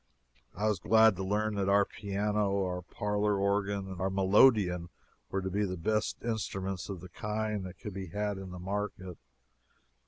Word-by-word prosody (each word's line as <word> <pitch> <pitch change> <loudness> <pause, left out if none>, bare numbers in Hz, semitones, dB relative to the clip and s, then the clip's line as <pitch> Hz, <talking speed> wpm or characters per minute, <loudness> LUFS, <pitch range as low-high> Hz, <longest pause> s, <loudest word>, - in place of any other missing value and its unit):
I 105 +3 0
was 105 -4 +1
glad 110 +2 +5
to 95 - -3
learn 105 +2 0
that 100 -1 0
our 100 0 +5
piano, 100 -1 -1
our 90 0 -3
parlor 105 +3 -1
organ, 100 0 0
and 95 -2 -7
our 95 - +1
melodeon 95 -2 +4 0.4
were 95 0 -2
to 95 - -2
be 105 +3 +1
the 95 -2 -2
best 105 +6 -1
instruments 95 -5 -3
of 95 -4 -5
the 95 - -10
kind 105 +1 -2
that 90 0 -11
could 105 - -7
be 95 0 -5
had 105 +3 -2
in 95 -1 -7
the 90 - -8
market. 95 -1 -4
100 Hz, 180 wpm, -31 LUFS, 95-105 Hz, 0.4 s, glad